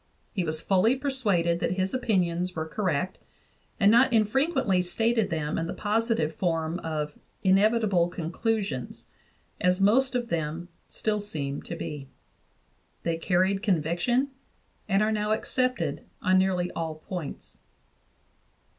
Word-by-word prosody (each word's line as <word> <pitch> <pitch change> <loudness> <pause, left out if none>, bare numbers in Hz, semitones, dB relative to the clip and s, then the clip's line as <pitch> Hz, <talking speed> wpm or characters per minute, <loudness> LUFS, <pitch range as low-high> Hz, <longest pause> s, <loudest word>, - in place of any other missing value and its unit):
He 190 - 0
was 155 -1 -3
fully 200 +6 +3
persuaded 205 -12 +1
that 175 - 0
his 190 0 -1
opinions 180 -8 0
were 160 0 -3
correct, 180 -2 -1 0.6
and 200 0 +6
not 240 +3 +5
infrequently 230 - +2
stated 225 +4 +1
them 155 -1 -2
in 165 - -2
the - - -4
positive 215 -7 0
form 165 0 -1
of 150 -3 -3 0.3
"inevitable 195 -2 +3
conclusions," 175 - -3 0.5
as 180 +1 +2
most 250 +6 +3
of 240 -1 -1
them 165 +1 -3 0.2
still 215 -1 -1
seem 145 -9 -3
to 170 - -6
be. 145 -4 -6 1.0
They 165 -1 0
carried 185 +3 +1
conviction 195 - +1 0.6
and 195 +2 +3
are 215 - +1
now 210 0 +1
accepted 255 +3 0 0.2
on 185 0 +3
nearly 180 -2 +1
all 160 -1 -3
points. 155 - -7
185 Hz, 130 wpm, -27 LUFS, 165-220 Hz, 1.0 s, and